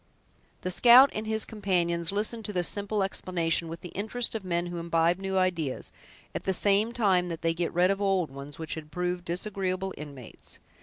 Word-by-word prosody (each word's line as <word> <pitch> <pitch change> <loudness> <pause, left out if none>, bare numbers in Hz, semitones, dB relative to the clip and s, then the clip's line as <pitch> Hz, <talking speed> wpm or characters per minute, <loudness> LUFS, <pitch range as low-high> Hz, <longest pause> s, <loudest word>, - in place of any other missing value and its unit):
The 185 - -1
scout 245 +8 +8
and 215 0 -4
his 220 0 +1
companions 175 -5 0
listened 215 +3 -1
to 210 - -4
this 180 -2 +1
simple 205 0 -2
explanation 170 -3 -1
with 165 +1 -7
the 180 - -8
interest 220 +6 -2
of 220 -3 -4
men 175 -1 -1
who 175 -1 -5
imbibe 170 +1 +1
new 190 0 -2
ideas, 175 -7 0 0.4
at - - -4
the 190 - +2
same 205 +4 +2
time 190 -7 +2
that 165 -1 -6
they 165 0 +2
get 170 0 -2
rid 180 +2 +3
of 195 +1 -2
old 190 -6 +1
ones, 140 +1 -8
which 160 -1 -3
had 155 -1 -7
proved 180 +2 -2
disagreeable 190 +1 -2
inmates. 140 -6 -10
185 Hz, 195 wpm, -28 LUFS, 170-200 Hz, 0.4 s, scout